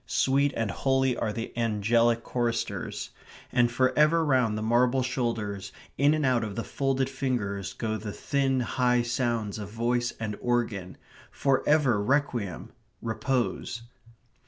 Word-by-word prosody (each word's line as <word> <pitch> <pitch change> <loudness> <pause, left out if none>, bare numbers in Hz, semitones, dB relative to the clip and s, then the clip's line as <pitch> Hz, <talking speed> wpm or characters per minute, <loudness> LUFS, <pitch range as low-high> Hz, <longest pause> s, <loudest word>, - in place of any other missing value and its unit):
Sweet 135 +2 +2
and 115 -3 0
holy 135 -2 +1
are 110 - -1
the 115 +1 -5
angelic 115 +1 +2
choristers. 120 -2 -2 0.4
And 120 -1 +3
for 130 +2 +2
ever 160 +2 +4
round 125 -7 +2
the 110 - -3
marble 120 +3 +3
shoulders, 110 -6 -2 0.2
in 145 +2 +4
and 155 -2 0
out 125 -3 +2
of 105 -2 -4
the 115 - -2
folded 135 -1 0
fingers, 120 -8 -2
go 110 -1 -2
the 105 -1 -6
thin 135 +2 0
high 125 0 +1
sounds 120 -3 -1
of 100 -1 -6
voice 120 +2 0
and 110 -2 -3
organ. 115 -7 -1 0.3
For 135 -1 +1
ever 135 -9 +4
requiem 120 - -1 0.3
repose. 120 0 -2
120 Hz, 140 wpm, -27 LUFS, 110-130 Hz, 0.4 s, ever